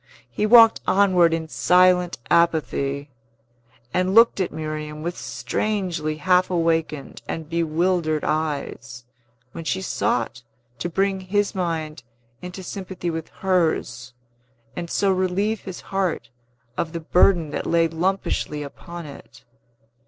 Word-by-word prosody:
He 210 - 0
walked 230 0 +7
onward 185 -4 +4
in 165 -1 -2
silent 180 +7 +3
apathy, 145 -4 +1 0.8
and 185 +2 +1
looked 230 -2 +6
at 185 - -1
Miriam 155 -1 -5
with 175 +1 -3
strangely 155 - -2
half 180 +3 +3
awakened 165 -4 -1
and 160 -2 -5
bewildered 165 -1 0
eyes, 140 -6 -3 0.5
when 165 - -7
she 180 +4 -1
sought 125 -9 -1 0.4
to 175 - -2
bring 195 +2 0
his 200 +2 0
mind 160 -6 -3 0.4
into 180 +1 -8
sympathy 185 -1 -5
with 160 -1 -5
hers, 160 -9 -1 0.6
and 170 -1 -5
so 195 +2 +2
relieve 190 +4 0
his 190 -2 -7
heart 180 -11 -2 0.5
of 160 0 -2
the 170 - -3
burden 170 -1 +3
that - - -3
lay 165 0 +3
lumpishly 165 -3 -2
upon 170 +4 -9
it. 125 -4 -13
170 Hz, 125 wpm, -23 LUFS, 155-185 Hz, 0.8 s, walked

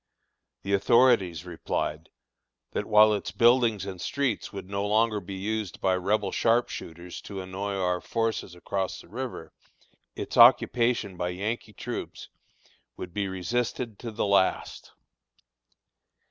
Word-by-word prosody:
The 100 - -2
authorities 100 - +3
replied, 80 -2 -3 0.6
that - - -3
while 105 0 +6
its 105 - -3
buildings 115 -4 +3
and 95 -3 -7
streets 140 -5 -1
would 100 -2 -7
no 100 +1 -2
longer 110 +1 +2
be 95 0 -8
used 105 +1 -3
by 95 - +2
Rebel 100 +2 0
sharp 120 +1 +2
shooters 85 +2 -8
to 100 -2 -7
annoy 95 +2 -4
our 90 -2 0
forces 115 -5 -2
across 95 +2 -3
the - - -17
river, 120 -3 -6 0.6
its - - -5
occupation 115 -6 +5
by 90 - -1
Yankee 105 +4 -4
troops - - -6 0.7
would 90 -2 -7
be 100 0 -1
resisted 115 +4 -3
to 120 - -6
the 110 -1 -2
last. 100 -2 +1
100 Hz, 130 wpm, -27 LUFS, 95-115 Hz, 0.7 s, while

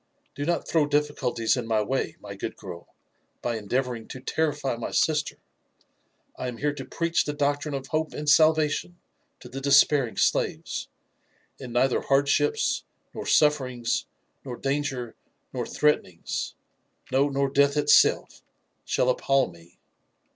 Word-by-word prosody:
" - - -43
Do 145 - -3
not 170 +1 -1
throw 155 -3 +2
difficulties 145 -6 0
in 125 -3 -4
my 110 -2 +2
way, 135 +5 -2
my - - -8
good - - -5
girl, 85 -3 -9 0.6
by 120 - -1
endeavouring 120 +2 -2
to 130 - -8
terrify 145 -1 -1
my 115 - -5
sister. 155 -2 +1 1.0
I 130 - -4
am 125 -2 -5
here 145 +2 0
to 145 - -7
preach 170 0 0
the 150 - -3
doctrine 145 0 0
of 135 -1 -4
hope 155 +2 -1
and 150 - -5
salvation 155 +2 +3 0.4
to - - -10
the 135 +2 -7
despairing 140 -2 +4
slaves, - - 0 0.7
and 125 -3 -8
neither 125 +2 +2
hardships, 140 +1 +2 0.3
nor - - -6
sufferings, 130 -6 +2 0.4
nor 125 -3 -6
danger, 135 -4 -2 0.4
nor - - -3
threatenings 150 - -1 0.3
— - - -30
no, 135 +2 +3
nor 140 0 +1
death 140 +1 +3
itself, 150 - +4 0.4
shall 125 - 0
appal 135 -7 +1
me. 85 +1 -19
140 Hz, 145 wpm, -26 LUFS, 125-150 Hz, 1.0 s, despairing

